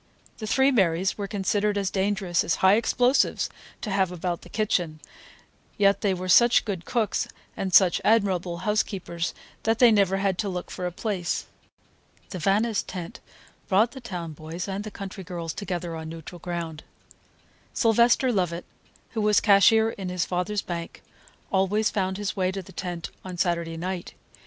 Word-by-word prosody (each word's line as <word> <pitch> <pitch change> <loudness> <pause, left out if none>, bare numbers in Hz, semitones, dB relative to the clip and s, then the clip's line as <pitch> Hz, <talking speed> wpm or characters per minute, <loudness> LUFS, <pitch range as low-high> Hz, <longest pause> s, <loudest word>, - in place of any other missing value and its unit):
The 215 - -5
three 265 +5 +4
Marys 190 -5 +2
were 200 -1 -4
considered 205 +1 0
as 195 -2 -1
dangerous 195 -3 0
as 170 - +1
high 190 - +7
explosives 245 +4 +2 0.3
to 210 - -4
have 190 -2 +1
about 175 -1 -3
the - - -14
kitchen, 175 -7 -1 0.8
yet 200 -1 +3
they 205 - +2
were 185 0 -3
such 240 +6 +6
good 190 -6 -4
cooks 235 -4 0 0.3
and 190 - -3
such 180 -1 +5
admirable 190 -6 +2
housekeepers 195 -5 -1 0.3
that 225 0 +1
they 240 -1 +7
never 195 -3 +3
had 195 -2 0
to 205 - 0
look 180 -1 -5
for 180 -1 -3
a - - -4
place. 185 -2 -2 0.9
The 185 - -4
Vannis' 205 +5 +2
tent 175 -3 -7 0.5
brought 215 +5 +3
the 265 - -10
town 175 -8 -5
boys 160 +5 -6
and 195 +1 -3
the 215 - -6
country 195 -1 -8
girls 170 -2 -5
together 175 -4 -4
on 160 0 -6
neutral 165 +2 -9
ground. 170 -2 -5 0.9
Sylvester 235 +2 +3
Lovett, 175 -4 -1 0.5
who 225 - -2
was 210 0 +4
cashier 220 +3 +5
in 195 -4 -6
his 180 -1 -1
father's 190 +3 -1
bank, 170 -1 -6 0.5
always 200 +3 +2
found 190 -2 -1
his 205 -1 -3
way 185 -1 +1
to 195 0 -5
the 190 - -14
tent 175 -2 -5
on 185 -1 -7
Saturday 170 -2 -1
night. 180 +1 -5
190 Hz, 165 wpm, -26 LUFS, 175-210 Hz, 0.9 s, high